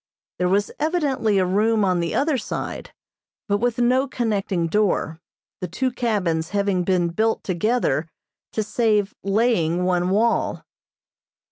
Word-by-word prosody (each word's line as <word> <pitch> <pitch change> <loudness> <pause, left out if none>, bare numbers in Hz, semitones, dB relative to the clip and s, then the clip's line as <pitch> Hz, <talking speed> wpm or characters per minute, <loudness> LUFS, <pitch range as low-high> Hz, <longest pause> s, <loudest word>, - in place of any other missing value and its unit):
There 180 0 +1
was 200 +2 +1
evidently 290 - +1
a 185 - +3
room 210 +3 +2
on 180 -2 +1
the 170 -1 -2
other 295 +1 +2
side, 245 - -5 0.6
but 205 -1 +1
with 240 0 0
no 250 +3 +2
connecting 210 -8 -1
door, 165 -3 0 0.4
the 180 - -4
two 255 +10 -1
cabins 185 -10 -1
having 200 -3 0
been 175 -1 +1
built 220 +6 0
together 180 - 0 0.4
to 220 - 0
save 210 -1 +1
laying 195 -5 +1
one 180 0 +1
wall. 225 +4 +1
205 Hz, 135 wpm, -22 LUFS, 180-230 Hz, 0.6 s, a